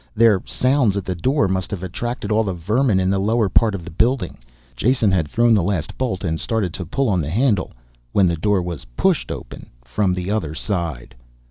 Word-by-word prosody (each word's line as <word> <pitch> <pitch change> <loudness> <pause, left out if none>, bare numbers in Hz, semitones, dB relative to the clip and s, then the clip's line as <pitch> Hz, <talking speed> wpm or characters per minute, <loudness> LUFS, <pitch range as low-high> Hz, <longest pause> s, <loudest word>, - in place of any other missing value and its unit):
Their 110 -4 +5
sounds 125 -6 +2
at 100 - -3
the 95 - -2
door 125 - +1
must 95 -1 -2
have 95 -3 -5
attracted 110 +4 -4
all 110 +1 +3
the 95 -4 -3
vermin 105 +5 +1
in 95 0 +1
the 100 - +1
lower 110 +1 +1
part 110 +2 +3
of 85 -4 -7
the 90 - -8
building. 115 +2 0 0.4
Jason 115 - +2
had 85 -5 +1
thrown 120 +8 +3
the 105 - +4
last 85 -4 -2
bolt 115 -9 -2
and 80 -3 -1
started 105 -7 -1
to 90 - -5
pull 135 +9 0
on 95 -5 +1
the 75 - -3
handle 105 - +1 0.4
when 100 - +4
the 85 -2 +1
door 95 +3 +1
was 85 -4 -6
pushed - - +1
open - - -8 0.2
from 90 +9 0
the 90 +2 -3
other 80 -8 -2
side. 85 - -3
95 Hz, 215 wpm, -21 LUFS, 90-115 Hz, 0.4 s, Their